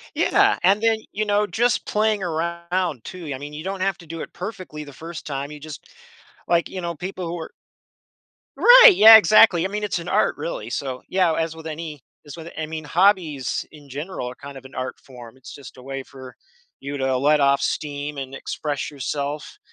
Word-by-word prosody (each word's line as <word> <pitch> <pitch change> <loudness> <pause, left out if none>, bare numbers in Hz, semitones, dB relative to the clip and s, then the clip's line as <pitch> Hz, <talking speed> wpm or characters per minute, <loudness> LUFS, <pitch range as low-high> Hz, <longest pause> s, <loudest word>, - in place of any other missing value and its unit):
Yeah, 405 0 +3
and 195 +4 +4
then, 225 -1 +3
you 215 - -1
know, 210 0 +1
just 240 +2 0
playing 215 -1 +1
around 170 -3 -2
too. 170 -5 -7
I 130 - -6
mean, 145 +1 -8
you 155 +2 -8
don't 190 0 -4
have 195 -1 0
to 170 - -15
do 165 +1 -7
it - - -7
perfectly 180 -6 -7
the 145 - -12
1st 165 +4 -9
time 140 0 -4
you 150 -1 -10
just 155 -1 -10 0.6
like, 170 -1 +2
you 185 - -6
know, 170 -1 -4
people 180 +2 -6
who 170 +1 -4
are 160 - -8 1.0
Right, - - +9
yeah, 220 -5 +10
exactly. 215 -5 +6
I - - 0
mean, 210 +1 -4
it's 205 - -1
an 170 - -8
art - - +1
really. - - -5
So, 130 -2 -4
yeah, 185 -3 +2
as 160 0 -2
with 160 0 -11
any 155 -3 -7 0.2
as 145 - -9
with 165 0 -9
I 155 - -2
mean, 160 0 -6
hobbies 170 -5 +1
in 145 -2 -15
general 145 -1 -5
are 125 - -8
kind 140 +1 -10
of 135 - -15
an 130 - -14
art 130 0 -5
form, 125 -2 -13
it's 130 - -12
just 140 - -12
a 130 - -13
way 135 +1 -6
for 130 -1 -12 0.5
you 140 +1 -5
to 130 -1 0
let 150 +3 +3
off 140 0 +3
steam 145 0 -3
and 135 0 -6
express 145 +2 -4
yourself. 145 - -5
160 Hz, 210 wpm, -22 LUFS, 140-185 Hz, 1.0 s, yeah